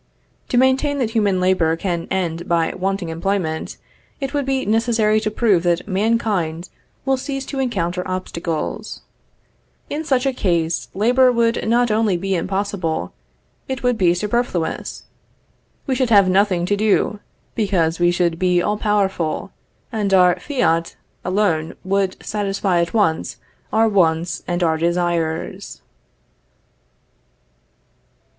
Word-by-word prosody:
To 245 - +1
maintain 265 +3 +3
that 240 -5 -1
human 205 -5 +1
labor 180 -3 +2
can 170 -2 -3
end 170 -2 -2
by 165 -1 +1
wanting 190 -1 -2
employment, 165 -1 -2 0.4
it 275 -1 -4
would 285 -2 -1
be 270 -1 0
necessary 220 -1 +2
to 215 - -1
prove 210 -5 +2
that 175 +1 0
mankind 190 -5 0 0.4
will 270 -1 +2
cease 270 0 -4
to 275 - -5
encounter 180 -9 -1
obstacles. 170 -3 -4 0.9
In 300 +2 -2
such 265 -4 +1
a 270 - +1
case, 170 -7 0
labor 250 +5 +4
would 230 -1 +2
be - - -5
not 240 0 +3
only 195 -3 +1
impossible, 185 - -2 0.5
it 265 -1 -4
would 245 -1 +2
be 175 -5 +3
superfluous. 210 -4 -2 0.8
We 270 - 0
should 255 -1 0
have 200 -4 +6
nothing 185 -2 +2
to 205 - +1
do, 210 0 +1 0.3
because 180 -7 0
we 175 0 +4
should 175 -1 0
be 180 -1 +3
all 210 +4 0
powerful, 195 -7 0 0.4
and 210 -4 -1
our 180 -1 +4
fiat 170 - 0 0.3
alone 180 -5 0
would 195 0 0
satisfy 195 -3 0
at 170 +6 -3
once 180 -7 +1 0.3
our 225 +1 +3
wants 170 -4 +1
and 175 0 -1
our 160 -1 +2
desires. 170 -1 -2
195 Hz, 130 wpm, -20 LUFS, 175-225 Hz, 0.9 s, have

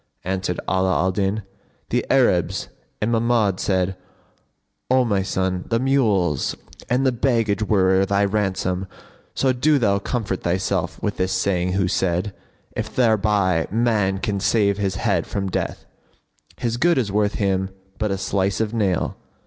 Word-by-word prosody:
Answered 95 -1 -2
Ala 95 0 +1
alDin, 95 +3 0 0.5
"The - - +1
Arabs," - - +2 0.3
and 105 +2 0
Mahmud 115 -4 +2
said, 95 -1 0 0.9
"O 130 0 +4
my 100 -4 +1
son, 95 -1 -1
the 115 - +2
mules 110 - +1 0.3
and 125 +3 +2
the 130 - +4
baggage 115 -4 +1
were 95 -2 +3
thy 100 +1 +2
ransom; 95 -2 -1 0.5
so 130 -1 +2
do 145 +4 +3
thou 100 -6 +2
comfort 100 -3 -3
thyself 90 +2 -1
with 105 - -2
his 95 0 0
saying 90 -1 0
who 95 -1 +1
said, 90 +2 0 0.4
'If - - -4
thereby 105 -7 +2
man 105 -3 +1
can 100 +1 -2
save 100 -1 +2
his 95 -2 -1
head 95 -3 0
from 100 -2 -3
death, - - -3 0.4
* - - -48 0.3
His 120 -1 -2
good 170 +5 +3
is 115 -6 0
worth 105 0 +1
him 95 -2 0 0.3
but 110 -1 0
a 95 - -1
slice 95 0 -1
of 110 0 -1
nail!' 100 -6 0
100 Hz, 150 wpm, -22 LUFS, 95-115 Hz, 0.9 s, O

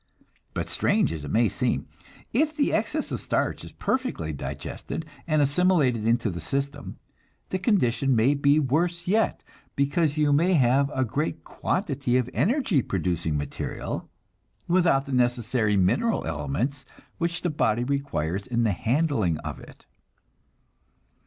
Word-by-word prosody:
But - - -2
strange 80 - +1
as 80 -3 -6
it 75 - -6
may 115 +6 +3
seem, - - -1 0.5
if 305 +6 +2
the 285 - +2
excess - - -1
of - - -3
starch - - -1
is - - -9
perfectly 170 - -2
digested 115 - -5 0.2
and 155 -2 +3
assimilated 140 - +2
into 115 -2 +2
the 85 - -5
system, 140 +5 -3 0.5
the 185 - -1
condition 135 - +2
may 115 +5 +4
be 145 +1 +3
worse 170 +5 0
yet, 215 +4 +1 0.3
because 145 +2 +1
you 150 -1 +3
may 175 +6 +3
have 135 0 +3
a 130 0 +2
great 150 +7 -2
quantity 140 - -1
of 125 -1 -1
energy 230 - +2
producing 85 -6 -1
material, 70 -1 -4 0.6
without 170 -6 +3
the 140 - -7
necessary 120 -3 +1
mineral 120 - +2
elements 80 - -2 0.4
which 170 -1 -1
the 175 - +1
body 120 -5 +1
requires 100 - -2
in 120 -1 0
the 110 - +2
handling 115 - +1
of - - -5
it. - - -15
135 Hz, 140 wpm, -26 LUFS, 110-165 Hz, 0.6 s, may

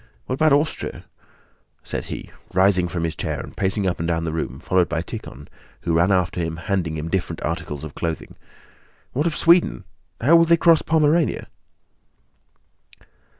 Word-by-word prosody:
What - - -3
about 155 +3 +3
Austria?" 145 +3 -1 0.8
said - - -4
he, - - -7 0.2
rising 95 -1 +4
from 85 -1 -3
his 80 -1 -2
chair - - -3
and - - -9
pacing 95 +1 0
up 90 -2 -1
and 85 - -2
down 85 -1 0
the 80 - -2
room 75 -5 -4
followed 85 +2 +1
by 85 0 -1
Tíkhon, 75 -4 -8 0.3
who 85 - -1
ran 85 +4 +3
after 90 -2 +1
him, 80 -1 -3
handing 85 -4 -2
him 75 +1 -4
different 85 -2 -2
articles 75 0 -3
of 80 -2 -7
clothing. 80 -2 -4 0.8
"What 150 +6 +1
of 160 - -1
Sweden? 170 +1 +4 0.4
How 155 +8 +6
will 165 - +5
they 170 0 +5
cross 165 -1 +5
Pomerania?" 160 0 +2
90 Hz, 165 wpm, -22 LUFS, -, 0.8 s, How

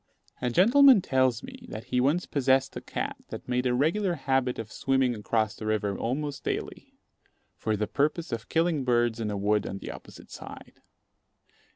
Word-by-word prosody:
A 125 - 0
gentleman 235 - +6
tells 130 -3 +1
me, - - -11
that 110 - -6
he 125 -1 0
once 150 +7 +2
possessed 135 -1 +1
a - - -5
cat - - -4
that - - -8
made 125 0 0
a 125 - +1
regular 175 +7 +1
habit 135 -3 0
of 110 -1 -6
swimming 135 -1 +1
across 110 0 -1
the 110 - -6
river 105 -2 0
almost 140 +6 -3
daily, - - -5 0.6
for 110 -1 -1
the 105 - 0
purpose 150 +7 -1
of 115 0 -5
killing 165 -3 +1
birds 120 -2 +1
in 110 -2 -2
a 105 - -2
wood 105 +1 +1
on 95 - -5
the - - -7
opposite - - -13
side. - - -11
125 Hz, 180 wpm, -27 LUFS, 115-150 Hz, 0.6 s, gentleman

